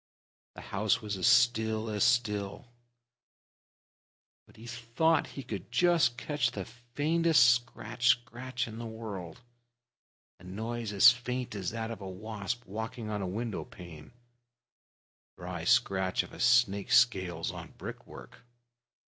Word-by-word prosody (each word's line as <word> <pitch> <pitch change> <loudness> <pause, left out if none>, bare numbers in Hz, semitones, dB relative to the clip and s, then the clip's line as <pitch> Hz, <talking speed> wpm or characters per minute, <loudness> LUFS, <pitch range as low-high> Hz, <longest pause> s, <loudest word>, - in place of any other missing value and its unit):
The - - -9
house 105 +2 0
was 105 -3 -4
as 95 - +1
still 110 -3 +3
as 105 -2 0
still, 115 -1 0 1.8
but - - -21
he 110 +2 -13
thought 120 +7 0
he 135 - -5
could 100 -5 -7
just 165 -9 +3
catch 145 -3 0
the 100 -6 -6
faintest 145 +5 +2
scratch 120 0 -3
scratch 125 +1 0
in 110 0 -8
the 120 - -5
world 105 -5 -7 1.0
a - - -17
noise 110 +4 -5
as 105 +4 +8
faint 125 0 -4
as 95 -4 -3
that 115 0 -4
of 115 - -7
a 95 - -6
wasp 105 +4 -5
walking 110 +2 -5
on 105 -1 -2
a 95 - -2
window 110 +3 -3
pane 80 -4 -12 1.3
the - - -13
dry - - -5
scratch 95 -1 +2
of - - -13
a - - -11
snake's 120 -5 +4
scales 95 -9 +1
on - - -10
brick - - -8
work. - - -12
115 Hz, 140 wpm, -30 LUFS, 100-120 Hz, 1.8 s, as